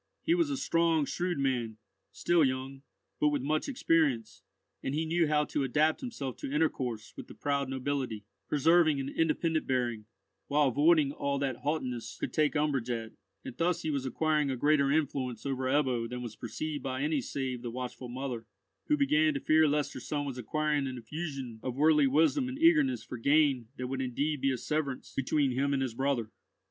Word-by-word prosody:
He 330 - +3
was 340 -3 +2
a 280 - -1
strong, 165 - +2
shrewd 175 +4 -2
man, 125 -5 -1 0.3
still 175 -2 +2
young, 135 0 -2 0.4
but 150 - +3
with 145 -3 0
much 155 - 0
experience, 160 - +1 0.4
and 135 - -2
he 160 +1 0
knew 165 0 +2
how 150 0 +2
to 145 - -2
adapt 155 +4 +2
himself 145 - -5
to - - -6
intercourse 130 -7 -1
with - - -9
the - - -12
proud 140 -2 -1
nobility, 130 -5 -3 0.2
preserving 155 0 +4
an 135 0 -3
independent 160 +1 0
bearing, 120 -4 -1 0.4
while 145 -1 +3
avoiding 150 +2 +4
all 140 -1 -2
that 135 -3 -1
haughtiness 125 -7 -3
could - - -3
take 155 -1 +2
umbrage 145 -5 0
at; 115 -2 -3 0.3
and - - -7
thus 170 +1 0
he 155 - -1
was 140 -3 -1
acquiring 150 +2 +1
a 130 - -1
greater 145 +1 +3
influence 135 -6 -1
over 130 -1 -2
Ebbo 130 -4 +1
than 125 0 -5
was 115 -3 -7
perceived 145 +5 -4
by 130 0 -3
any 150 -2 +1
save 130 -1 -4
the 120 - -4
watchful 125 +1 -6
mother, 125 -3 -5 0.4
who 300 - +3
began 305 +2 +3
to - - 0
fear 155 - +4
lest 145 0 0
her - - -6
son 145 +3 -3
was 130 -3 -5
acquiring 150 +3 0
an 130 - -4
infusion 135 -2 -6
of 130 -2 -4
worldly 150 0 +4
wisdom 165 - +2
and 260 - -5
eagerness 315 -4 +4
for 125 - -7
gain 140 -2 +3
that 125 - -3
would 135 +1 -3
indeed 140 +3 -1
be 135 - +2
a 130 - -1
severance 145 0 -3
between 135 +1 +1
him 140 +3 0
and 135 -1 +1
his 130 -3 -3
brother. 125 -3 -1
140 Hz, 195 wpm, -30 LUFS, 130-155 Hz, 0.4 s, preserving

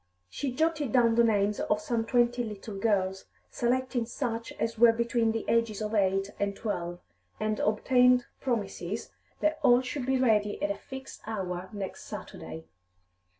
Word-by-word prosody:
She 275 - -2
jotted 310 -1 0
down 235 -2 +5
the 235 +1 +5
names 205 -2 +2
of 210 - +1
some 225 +1 -1
twenty 245 0 +2
little 210 -1 -7
girls, 195 -2 0 0.3
selecting 250 -1 0
such 230 -2 -3
as 230 - -2
were 235 0 +8
between 235 0 +1
the 225 0 -3
ages 230 -3 +1
of 215 0 -3
eight 195 -1 +2
and 200 0 0
twelve, 175 -6 -3 0.4
and 215 0 -1
obtained 250 +3 +4
promises 210 -5 -3 0.3
that 310 0 +1
all 250 -3 +6
should 255 0 -4
be 265 0 +3
ready 215 -5 +2
at 300 +1 0
a - - -2
fixed 265 -1 -9
hour 185 -4 -3
next 200 -2 -6
Saturday. 80 0 -8
230 Hz, 155 wpm, -29 LUFS, 205-250 Hz, 0.4 s, were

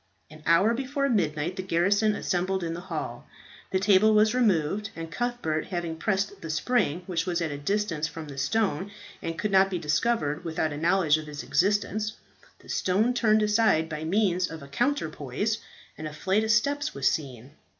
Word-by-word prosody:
An 155 0 -13
hour 190 +7 +5
before 275 +3 -1
midnight 170 - 0
the - - -1
garrison 195 +4 +2
assembled 185 0 -1
in 165 -1 -2
the 170 - -5
hall. 180 - -5 0.4
The 190 - +1
table 205 +2 +4
was 215 +1 +4
removed, 200 -4 +1
and 165 0 -7
Cuthbert 240 -10 -2
having 175 -3 -3
pressed 195 +3 -1
the 165 - -7
spring, 175 0 0
which 175 -1 -2
was 175 -2 0
at 165 -3 -2
a 145 - -4
distance 165 -2 -1
from 155 0 -8
the 140 -1 -7
stone 190 +3 0 0.3
and 165 0 -4
could 210 - -1
not 195 0 +5
be 185 - -2
discovered 155 0 0
without 160 -2 -1
a - - -5
knowledge 165 -1 +3
of 155 -1 -8
its 145 0 -6
existence, 210 +3 +1 0.4
the - - -20
stone 210 +7 +1
turned 215 -3 +3
aside 210 -7 +3
by 155 -1 -5
means 185 0 +1
of 160 -3 -8
a - - -10
counterpoise, 205 - -1 0.4
and 155 - -4
a 150 - -8
flight 190 +7 +1
of 220 - -2
steps 285 +6 +1
was 135 -1 +1
seen. 130 -4 -2
180 Hz, 185 wpm, -27 LUFS, 155-215 Hz, 0.4 s, hour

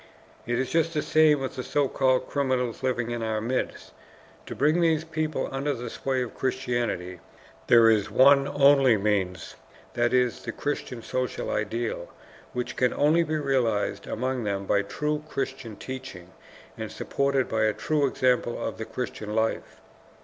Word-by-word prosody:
It 120 0 0
is 130 0 -2
just 165 0 +1
the 150 - 0
same 155 -2 +4
with 135 - -4
the - - -2
so 145 +1 +1
called 130 -1 +1
criminals 130 -4 -1
living 120 -2 -1
in 120 -1 -3
our 110 -1 -1
midst. 120 +4 -3 0.5
To - - -6
bring 155 +5 +2
these 160 -2 +2
people 155 -1 -2
under 140 +1 -1
the 120 -1 -6
sway 130 -2 -1
of 120 - -7
Christianity 120 -9 -2 0.5
there 115 -1 +7
is 110 -2 +3
one 135 +5 +5
only 140 -5 +5
means, 95 -4 -1 0.4
that 120 0 +1
is, 125 -2 +1
the - - -5
Christian 125 -5 -4
social 130 0 -3
ideal, 110 -4 -2 0.4
which 125 -1 -4
can 125 -1 +2
only 155 +4 +4
be 155 -1 -1
realized 115 -8 0
among 130 +1 -2
them 100 -2 -2
by 100 - +2
true 150 +9 -2
Christian 115 -6 -4
teaching 125 -9 -8 0.5
and - - -5
supported 140 -2 0
by 110 -1 +1
a 110 - +3
true 145 +7 0
example 125 -2 +1
of - - -4
the 110 - -4
Christian 110 -2 -5
life. 110 0 -2
125 Hz, 165 wpm, -26 LUFS, 110-140 Hz, 0.5 s, there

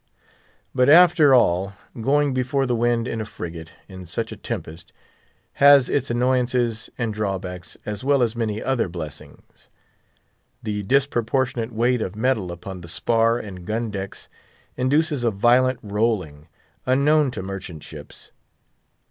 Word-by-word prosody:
But, 125 +1 +3
after 165 -2 +7
all, 100 -6 +3 0.3
going 145 +3 +2
before 130 +2 0
the 125 -2 0
wind 120 0 +1
in 115 - -3
a - - -4
frigate, 85 -4 -8 0.2
in 95 -2 -10
such 85 - -3
a - - -6
tempest, 80 +2 -7 0.7
has 140 -2 +7
its 140 -2 0
annoyances 120 -1 0
and 115 -3 -2
drawbacks, 95 -4 -5
as 105 +3 -5
well 140 -1 +3
as 115 -1 -1
many 110 -2 -2
other 125 -7 0
blessings. 80 -4 -10 0.9
The 105 -2 -2
disproportionate 125 0 0
weight 120 +2 +1
of 95 -2 -4
metal 110 -5 0
upon 90 +1 -8
the 85 - -10
spar 115 +5 +1
and 95 -6 -8
gun 110 +3 -3
decks 95 -1 -7 0.5
induces 145 +2 +1
a 120 - +3
violent 120 +5 +3
rolling, 100 -8 -2 0.4
unknown 140 +3 +3
to 105 - -6
merchant 95 -5 -7
ships. - - -12
115 Hz, 140 wpm, -23 LUFS, 95-130 Hz, 0.9 s, after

